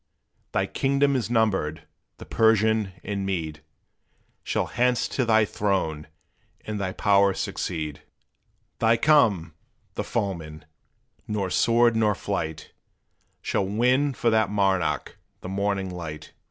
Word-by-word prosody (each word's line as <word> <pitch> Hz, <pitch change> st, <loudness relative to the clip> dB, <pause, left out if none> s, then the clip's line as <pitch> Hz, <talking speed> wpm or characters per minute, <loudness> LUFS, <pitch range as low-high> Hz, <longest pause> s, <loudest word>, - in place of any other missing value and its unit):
Thy -, -, +1 dB
kingdom 140 Hz, +1 st, +1 dB
is 115 Hz, -5 st, -1 dB
numbered 100 Hz, -10 st, 0 dB, 0.3 s
the -, -, -10 dB
Persian 110 Hz, -2 st, +2 dB
and 100 Hz, -1 st, -3 dB
Mede 80 Hz, -5 st, -3 dB, 0.8 s
Shall -, -, -1 dB
hence 125 Hz, 0 st, +1 dB
to 130 Hz, -, -1 dB
thy 110 Hz, -1 st, +4 dB
throne 95 Hz, -8 st, -1 dB, 0.6 s
and 105 Hz, -1 st, -4 dB
thy 95 Hz, -1 st, -2 dB
power 100 Hz, 0 st, +3 dB
succeed!" 75 Hz, -4 st, -4 dB, 0.8 s
They 115 Hz, 0 st, +4 dB
come! 110 Hz, -, +3 dB, 0.4 s
the -, -, -3 dB
foemen 80 Hz, -6 st, -4 dB, 0.6 s
nor 100 Hz, -3 st, -2 dB
sword 115 Hz, 0 st, +3 dB
nor 105 Hz, -2 st, +2 dB
flight, 80 Hz, -7 st, -4 dB, 0.7 s
Shall 95 Hz, -, 0 dB
win 125 Hz, +7 st, +2 dB
for 115 Hz, -, +1 dB
that 110 Hz, -2 st, +2 dB
monarch 95 Hz, -8 st, 0 dB, 0.2 s
the 90 Hz, -, -7 dB
morning 100 Hz, -1 st, -1 dB
light! 80 Hz, -4 st, -7 dB
100 Hz, 120 wpm, -25 LUFS, 90-115 Hz, 0.8 s, thy